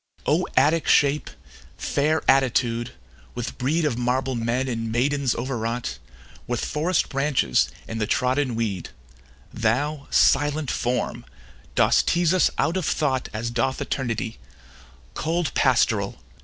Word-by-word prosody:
O - - +2
Attic 160 +2 +3
shape! 145 +1 +3 0.5
Fair 155 +3 0
attitude! 125 -2 +2 0.4
with 120 -1 -5
brede 155 +6 +1
Of 125 -5 -1
marble 130 +2 0
men 120 +2 -1
and 115 -2 -3
maidens 135 +2 +1
overwrought, 120 -1 -3 0.5
With 120 -1 -2
forest 160 +3 0
branches 135 - +1 0.2
and 115 0 -4
the 105 - 0
trodden 130 0 +1
weed; 105 -6 -2 0.6
Thou, 140 +6 -1
silent 145 -1 +3
form, 125 +1 -2 0.5
dost - - +3
tease 175 0 +3
us 185 - +4
out 170 +4 +1
of 185 - -2
thought 135 -4 0
As 115 +2 -3
doth 120 +3 0
eternity: 115 -4 -3 0.7
Cold 165 0 -1
Pastoral! - - +2
130 Hz, 125 wpm, -24 LUFS, 120-145 Hz, 0.7 s, us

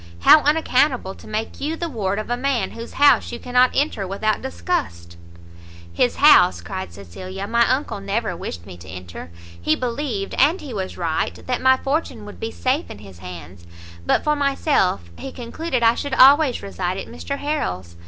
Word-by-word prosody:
how 305 - +8
unaccountable 280 -8 +2
to - - -15
make 215 +1 -4
you 305 +3 -1
the 340 +1 -3
ward 205 -9 -2
of 215 - -4
a - - +2
man 260 0 -1
whose 230 0 -9
house 285 +1 +4
you 240 - -5
cannot 250 +1 +3
enter 265 -9 0
without 215 +3 -1
disgust!" 85 - -3 0.8
"His - - +1
house," 90 - +6
cried 85 +1 -6
Cecilia, 100 - -8
"my 235 +2 +2
uncle 260 -5 -1
never 200 0 -2
wished 85 - -7
me 90 - -10
to 85 +2 -14
enter; 90 -2 -9 0.3
he 155 - +2
believed, 240 - -3
and 335 +6 +4
he 275 -5 -8
was 190 -3 -4
right, 165 -3 -2
that 250 -1 -2
my 260 0 +5
fortune 270 -6 -2
would 205 - -11
be 225 - -3
safe 260 +6 -1
in - - -8
his 95 -4 -13
hands; 85 -1 -10 0.4
but - - +1
for 300 0 +2
myself, 275 - 0
he 270 - -6
concluded 255 +2 -3
I 230 0 +6
should 270 +2 -3
always 275 0 +6
reside 185 -2 -3
at - - -5
Mr 280 +4 -6
Harrel's." 90 - -3
225 Hz, 185 wpm, -21 LUFS, -, 0.8 s, how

